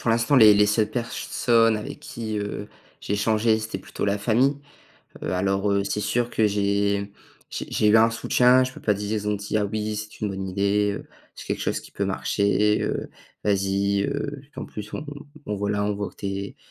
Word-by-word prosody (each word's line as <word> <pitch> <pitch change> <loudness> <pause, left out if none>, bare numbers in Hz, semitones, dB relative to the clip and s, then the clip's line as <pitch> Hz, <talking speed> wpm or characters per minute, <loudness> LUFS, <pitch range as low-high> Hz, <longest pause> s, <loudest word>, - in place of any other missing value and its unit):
pour 115 - 0
l'instant 115 +5 +2
les 110 -5 +8
les 105 0 +5
seules 105 0 +1
personnes 115 -1 +1
avec 105 - -7
qui, 110 -2 -5
heu, 105 0 -4 0.3
j'ai - - -4
échangé 110 +1 +2
c'était 110 -3 -4
plutôt - - -5
la 100 0 +1
famille. 125 +7 +2 0.7
Heu, - - -2
alors, 95 +2 +1
heu, 100 0 +1
c'est 105 - -2
sûr, 120 +3 0
que 110 -2 +2
j'ai 100 0 0 0.4
j'ai - - -5
j'ai 105 - +2
eu 110 - +6
un 115 +1 +5
soutien, 125 +2 +4
je 130 0 -3
peux - - -11
pas 105 - +3
dire, 100 +1 -4
ils 105 -1 -3
ont 105 - +1
dit: 105 +2 -3
«Ah 105 - +2
oui, 105 +1 -2
c'est 105 0 -7
une 105 - 0
bonne 95 0 -4
idée, 100 +2 +1
heu, - - -12 0.3
c'est - - -10
quelque - - -2
chose - - -1
qui - - -15
peut - - -2
marcher, 105 +1 +1
heu, - - -2 0.3
vas-y, 100 0 +1
heu, 140 +1 -3
qu'en - - -6
plus 105 0 -8
on 150 - -5 0.4
on 105 -1 -2
voilà. 100 0 -1
On 105 0 0
voit 100 0 -4
que - - -27
tu 100 - -5
es 100 0 -4
105 Hz, 215 wpm, -24 LUFS, 100-110 Hz, 0.7 s, les